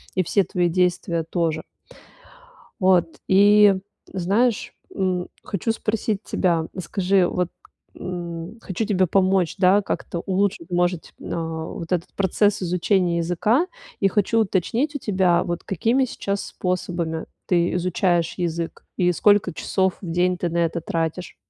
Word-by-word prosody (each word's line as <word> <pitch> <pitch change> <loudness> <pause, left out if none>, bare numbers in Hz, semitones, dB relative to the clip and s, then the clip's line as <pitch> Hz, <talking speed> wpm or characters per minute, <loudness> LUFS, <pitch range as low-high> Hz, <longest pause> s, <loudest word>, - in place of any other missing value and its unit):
И 185 - +2
все 200 +4 +2
твои 175 -1 0
действия 175 -1 0
тоже. 165 -3 0 1.2
Вот, 180 -4 +3
и, 205 +1 +6 0.4
знаешь, 205 +6 +1 0.2
м, 185 -2 -1 0.2
хочу 215 +3 -2
спросить 215 -2 -2
тебя, 170 -3 0
скажи, 185 +1 +2
вот 180 -1 -1 0.5
м 175 +2 -6
хочу 210 +1 -3
тебе 190 -3 +2
помочь, 185 -1 +2
да, 195 +2 +5
как-то 175 - -3
улучшить, 190 -2 0
может, 175 -1 0
а, - - -9 0.4
вот 165 +1 -7
этот 175 -2 -1
процесс 200 +1 +1
изучения 180 0 +1
языка. 195 - +1 0.3
И 195 - +4
хочу 205 +3 +1
уточнить 225 - 0
у - - -2
тебя, 185 -6 +2
вот 175 -2 -4
какими 230 +8 +1
сейчас 200 -4 -3
способами 175 -3 -3 0.2
ты 175 -1 +2
изучаешь 175 -1 +1
язык 170 -1 -3
и 180 -1 +3
сколько 205 +2 +3
часов 190 +2 0
в 180 - -6
день 180 +1 +1
ты 175 - -1
на 170 - -2
это 170 0 0
тратишь? 165 +2 -3
180 Hz, 135 wpm, -23 LUFS, 170-200 Hz, 1.2 s, и